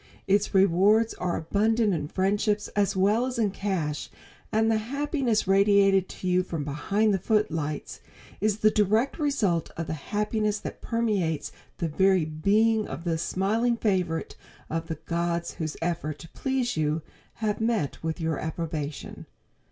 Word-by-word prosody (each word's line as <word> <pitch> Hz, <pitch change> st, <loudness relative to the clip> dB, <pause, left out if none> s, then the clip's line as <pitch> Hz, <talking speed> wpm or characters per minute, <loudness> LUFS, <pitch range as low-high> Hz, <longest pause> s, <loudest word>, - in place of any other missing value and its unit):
Its 200 Hz, +1 st, +2 dB
rewards 200 Hz, +4 st, +4 dB
are 180 Hz, -1 st, -2 dB
abundant 215 Hz, +5 st, +1 dB
in 150 Hz, -3 st, -2 dB
friendships 205 Hz, +4 st, 0 dB
as 200 Hz, -1 st, 0 dB
well 210 Hz, +6 st, +3 dB
as 255 Hz, -1 st, -4 dB
in 215 Hz, -4 st, +1 dB
cash, 180 Hz, -7 st, -2 dB, 0.4 s
and 220 Hz, +1 st, +3 dB
the 220 Hz, -, +3 dB
happiness 265 Hz, -, -1 dB
radiated 195 Hz, -1 st, +4 dB
to 185 Hz, -, -6 dB
you 180 Hz, 0 st, +3 dB
from 165 Hz, -4 st, -4 dB
behind 200 Hz, +9 st, +1 dB
the 195 Hz, -, +1 dB
footlights 165 Hz, -8 st, -1 dB, 0.4 s
is 210 Hz, 0 st, +1 dB
the 215 Hz, 0 st, +4 dB
direct 215 Hz, -, +2 dB
result 215 Hz, -, +1 dB
of 165 Hz, -, -2 dB
the 160 Hz, -, -3 dB
happiness 210 Hz, +6 st, -1 dB
that -, -, -7 dB
permeates 205 Hz, -10 st, -1 dB, 0.3 s
the 170 Hz, -, -1 dB
very 190 Hz, +2 st, +3 dB
being 210 Hz, +8 st, +2 dB
of 165 Hz, -, -6 dB
the 170 Hz, -2 st, 0 dB
smiling 215 Hz, +8 st, 0 dB
favorite 180 Hz, -7 st, -1 dB, 0.4 s
of 165 Hz, +1 st, -2 dB
the 160 Hz, -2 st, -4 dB
gods 170 Hz, 0 st, -1 dB
whose 155 Hz, -1 st, -3 dB
efforts 165 Hz, -3 st, -3 dB
to 165 Hz, -, -12 dB
please 260 Hz, -2 st, -1 dB
you 155 Hz, 0 st, 0 dB, 0.3 s
have 215 Hz, -1 st, -2 dB
met 225 Hz, -, 0 dB
with 160 Hz, +2 st, -3 dB
your 160 Hz, -2 st, -1 dB
approbation. 155 Hz, -3 st, -5 dB
195 Hz, 150 wpm, -27 LUFS, 165-215 Hz, 0.4 s, rewards